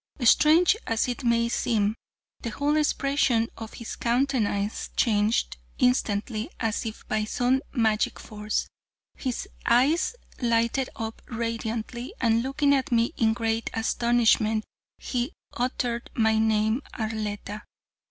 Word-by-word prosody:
Strange 320 - +6
as 225 +1 +1
it 250 +2 -4
may 235 -1 +3
seem, 220 -3 +1 0.5
the 235 - -4
whole 285 +6 0
expression 275 -6 +2
of 225 -1 -8
his 235 - -6
countenance 235 -5 0
changed 215 - +2 0.2
instantly 225 -1 +1
as 225 0 -1
if 220 - -8
by 215 0 0
some 250 +4 +1
magic 220 -4 +1
force; 210 0 -3 0.5
his 255 -3 -3 0.2
eyes 275 - +3 0.3
lighted 235 +2 +1
up 225 0 -5
radiantly, 230 +1 -4
and 230 -1 +3
looking 280 +3 +2
at 275 0 0
me 235 0 +2
in 220 -1 +3
great 225 -1 -1
astonishment 225 -1 +2 0.3
he 250 +5 -3 0.2
uttered 245 -1 -2
my 220 -1 +3
name 220 +2 +2
Arletta. 215 -2 -4
230 Hz, 120 wpm, -26 LUFS, 220-250 Hz, 0.5 s, Strange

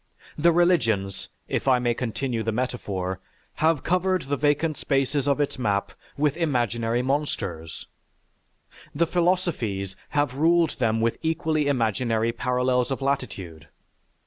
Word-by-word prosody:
The 170 +3 +4
religions, 115 - +1 0.2
if - - -2
I 130 -1 +5
may 120 -1 +1
continue 120 0 -2
the 110 +1 -1
metaphor, 100 -6 -3 0.4
have 160 -3 +2
covered 185 +1 +1
the 140 +2 -1
vacant 150 +2 +1
spaces 135 0 0
of 140 0 +2
its 145 -2 -1
map 100 -4 0 0.3
with 145 0 +1
imaginary 120 - 0
monsters; 95 - -3 1.1
the 170 +3 +3
philosophies 165 - 0 0.2
have 145 -3 +2
ruled 165 +2 +2
them 115 -2 +1
with 115 0 0
equally 160 -2 0
imaginary 115 -3 +1
parallels 125 +1 0
of 135 - -2
latitude. 110 - -3
130 Hz, 125 wpm, -25 LUFS, 115-150 Hz, 1.1 s, I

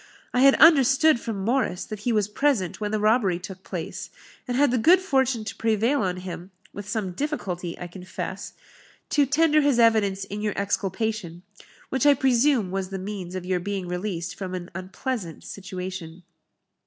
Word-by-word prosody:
I 250 - +2
had 275 0 +7
understood 290 -2 +6
from 205 -5 -4
Morris 235 -7 0
that 215 - -7
he 235 +4 -1
was 210 -3 +2
present 215 - 0
when 210 - -1
the 215 0 -1
robbery 215 -4 +2
took 185 +1 -9
place, 175 -4 -6 0.4
and 245 0 -1
had 285 -2 +4
the 250 - +1
good 345 +10 +6
fortune 265 - +1
to 215 - -5
prevail 225 +5 +1
on 185 -2 -1
him 180 0 -7 0.2
(with 205 0 -8
some 205 -4 -2
difficulty, 180 - -4
I - - -6
confess) 180 +1 -7 0.6
to 290 -2 +3
tender 305 +2 +3
his 285 -4 +2
evidence 215 -4 +3
in 205 +2 -6
your 210 -1 -2
exculpation 200 -3 -2 0.5
which 265 +2 +1
I 285 - +7
presume 255 -5 +2
was 190 -1 -3
the 195 - -4
means 190 -2 -6
of 185 -1 -5
your 185 -1 0
being 195 0 -4
released 180 -1 -3
from 185 -2 -5
an 175 -1 -7
unpleasant 190 - -5
situation." 185 -3 -7
205 Hz, 175 wpm, -25 LUFS, 185-255 Hz, 0.6 s, had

